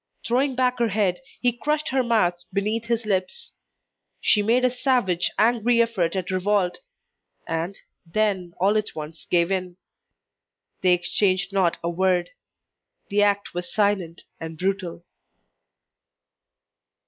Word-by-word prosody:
Throwing 260 +3 +1
back 250 -1 +1
her 235 - +3
head 200 -4 0 0.2
he 245 - +3
crushed 300 +6 -1
her 265 0 +2
mouth 180 -8 +1
beneath 215 +3 -1
his 235 -1 -1
lips. 195 - -2 0.7
She 210 - +3
made 240 +5 +3
a 250 - +3
savage, 245 -9 +1
angry 235 +1 +3
effort 200 -7 +1
at 185 -1 -2
revolt, 185 0 +1 0.7
and, 165 +4 -3 0.3
then 185 -1 -1
all 200 +4 +3
at 215 - -6
once 155 +1 -8
gave 170 +1 +2
in. 185 -2 -2 1.0
They 180 -1 +5
exchanged 185 +2 +1
not 185 -4 +2
a 170 - 0
word. 180 0 +1 0.8
The 205 +1 +2
act 205 0 +1
was 175 0 -5
silent 200 -5 0 0.2
and 160 -1 -7
brutal. 185 -2 -2
195 Hz, 130 wpm, -24 LUFS, 180-230 Hz, 1.0 s, They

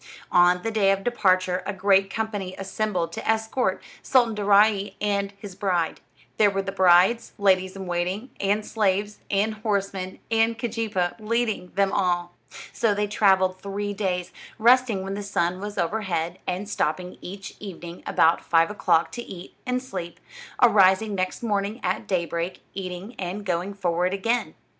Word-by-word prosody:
On 180 0 +4
the 225 - -1
day 210 -3 +3
of 195 - +2
the 245 - -1
departure 185 -4 +2
a 205 - -2
great 195 0 +3
company 205 -4 -3
assembled 195 -3 -2
to 170 - -5
escort 220 +3 0 0.2
Sultan 240 -4 +3
Daaraaee 205 0 +3
and 200 -1 0
his 200 -1 -9
bride. 180 -4 -1 0.4
There 210 -1 +5
were 195 0 -2
the 195 - -4
bride's 190 +4 +4
ladies 190 -2 +2
in 195 -1 -6
waiting, 180 +7 -2
and 205 +2 0
slaves, 205 -1 0
and 205 +2 +1
horsemen, 200 -3 -2
and 225 0 +2
Keejeepaa 220 -6 -2
leading 220 -4 -1
them 195 0 +2
all. 175 -3 0 0.4
So 220 -3 +1
they 210 +1 +1
traveled 190 -3 +2
three 205 +1 -3
days, 185 -3 -2 0.3
resting 235 -3 +4
when 195 +1 -4
the 205 - -4
sun 180 -3 -1
was 205 0 -6
overhead, 175 -2 -1
and 185 +3 -2
stopping 180 -2 -2
each 195 +2 -8
evening 175 -4 -8
about 165 +1 +3
five 165 +2 +3
o'clock 170 -5 +2
to 240 - -5
eat 185 -6 -10
and 250 0 -1
sleep; 180 -8 -6 0.4
arising 205 -2 +5
next 185 +3 -2
morning 205 0 -1
at - - -1
day 180 -3 0
break, 170 +3 -4
eating, 190 +3 -6
and 190 +2 -4
going 185 +2 -2
forward 180 0 0
again. 230 +5 -1
195 Hz, 160 wpm, -25 LUFS, 180-210 Hz, 0.4 s, There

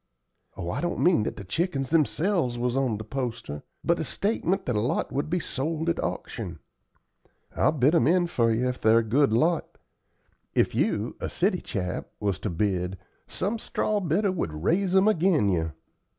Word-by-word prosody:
"Oh, 85 0 -3
I - - -2
don't 175 0 -1
mean 175 -10 +4
that - - -3
the 100 - -6
chickens 135 - -2
themselves 160 -4 +1
was 125 +1 -1
on 130 -5 +1
the 110 - -6
poster, 115 - -4 0.2
but - - +2
a - - 0
statement 195 -2 -1
that 125 - -1
a - - +2
lot 115 +4 -1
would 140 +3 -2
be 180 +2 +1
sold 160 +3 -2
at 170 - -1
auction. 95 -8 -4 1.0
I'll - - +3
bid 145 0 +3
'em 140 -7 +4
in 175 +2 +4
for 115 -9 +1
you 120 +3 +1
if 125 0 -3
they're 110 +1 +5
a 115 - +3
good 130 +4 +3
lot. 160 +9 +1 0.8
If - - +3
you, - - 0
a - - -3
city - - 0
chap, 90 0 -3
was 100 -3 -1
to 105 - -3
bid, 90 0 -1 0.3
some 215 +4 -2
straw 215 -1 -1
bidder 190 +3 +1
would 80 - -3
raise 185 - +2
'em 190 +2 +5
agin 170 - +3
you. 80 -4 0
135 Hz, 185 wpm, -26 LUFS, 105-175 Hz, 1.0 s, they're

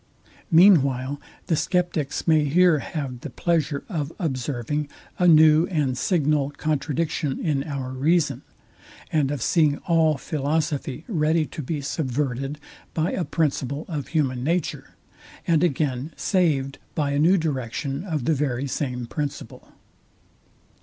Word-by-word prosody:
Mean 175 -1 +7
while 135 +1 -3 0.2
the 165 - +1
sceptics 175 -4 -1
may 155 -2 +4
here 170 +2 +4
have 135 -5 -5
the 150 - -7
pleasure 150 +1 -1
of 155 -7 -3
observing 145 - -2 0.3
a 180 - +4
new 155 0 +6
and 145 -7 0
signal 150 -2 +1
contradiction 150 -1 -1
in 150 -5 0
our 140 -4 -4
reason, 140 0 +1 0.7
and 150 -4 +2
of 140 -5 -2
seeing 150 -4 +3
all 160 -3 +3
philosophy 150 +1 -2
ready 160 -5 +1
to 155 - -7
be 150 +2 -3
subverted 135 -1 -2 0.4
by 160 +2 +1
a 185 - -1
principle 145 -3 -1
of 150 -7 -4
human 135 -6 0
nature, 170 +3 -2 0.5
and 165 -1 +3
again 145 -2 -1
saved 150 -8 0 0.2
by 145 -3 0
a 140 - 0
new 175 +6 +5
direction 140 -1 -3
of 155 -9 -3
the 160 - +3
very 135 -2 -1
same 125 -3 -3
principle. 140 -1 -6
150 Hz, 135 wpm, -24 LUFS, 135-160 Hz, 0.7 s, Mean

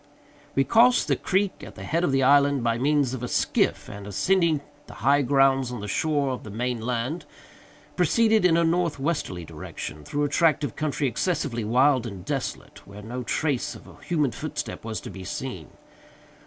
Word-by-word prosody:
We 135 - +4
crossed 245 - +4
the - - +2
creek 195 +1 -1
at - - -10
the - - -9
head 165 +3 0
of 160 - +2
the 135 0 +2
island 140 -1 +4
by 115 0 +1
means 140 -1 +2
of 130 - -5
a 125 - -3
skiff, - - 0
and, 100 0 -8
ascending 165 - +2 0.3
the - - -11
high 140 +1 +5
grounds 135 -1 +3
on 120 - -5
the 105 - -6
shore 145 +5 0
of 130 - -4
the 110 - -9
main 120 +2 -2
land, 125 +7 -2 0.7
proceeded 220 -2 +3
in 170 -2 +4
a 170 - +3
northwesterly 165 - -1
direction, 75 0 -8
through 145 - -2
a - - +2
tract 155 0 +3
of 130 -8 -3
country 150 -2 -1
excessively 130 -5 -1
wild 125 +3 +3
and 95 -5 -8
desolate, - - -4
where 100 +1 -11
no 125 +4 -5
trace 140 +1 -1
of - - -13
a - - -16
human 150 -7 +1
footstep - - -5
was 110 -1 -4
to - - -8
be 95 0 -9
seen. 95 - -5
135 Hz, 190 wpm, -25 LUFS, 115-155 Hz, 0.7 s, high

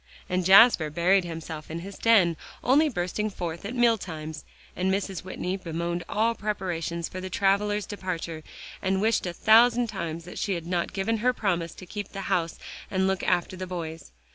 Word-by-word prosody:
And 185 0 0
Jasper 190 -3 +7
buried 175 +4 +3
himself 160 -2 -7
in 165 +1 -5
his 195 +2 -9
den, 195 -8 +5 0.3
only 295 +5 +4
bursting 210 0 -2
forth 170 -3 -5
at 230 +5 -4
meal 235 -2 +4
times, 155 -3 -7 0.3
and 185 +2 0
Mrs. 195 -1 -2
Whitney 185 0 -3
bemoaned 170 0 -3
all 225 +2 +2
preparations 175 -6 -3
for 185 - -7
the 185 - -5
travelers' 205 +2 +1
departure, 170 -5 -5 0.4
and 190 0 +1
wished 220 -2 +1
a - - -2
thousand 230 +4 +5
times 170 -5 -5
that 180 - -8
she 195 - 0
had 170 -1 -5
not 175 0 -1
given 195 +4 -1
her 250 +4 +2
promise 175 -8 -1
to 185 - -10
keep 205 +2 -7
the 195 - -4
house 165 -3 0 0.3
and 190 0 +1
look 190 -1 0
after 180 +1 0
the 185 0 -6
boys. 165 - -6
185 Hz, 185 wpm, -27 LUFS, 170-205 Hz, 0.4 s, Jasper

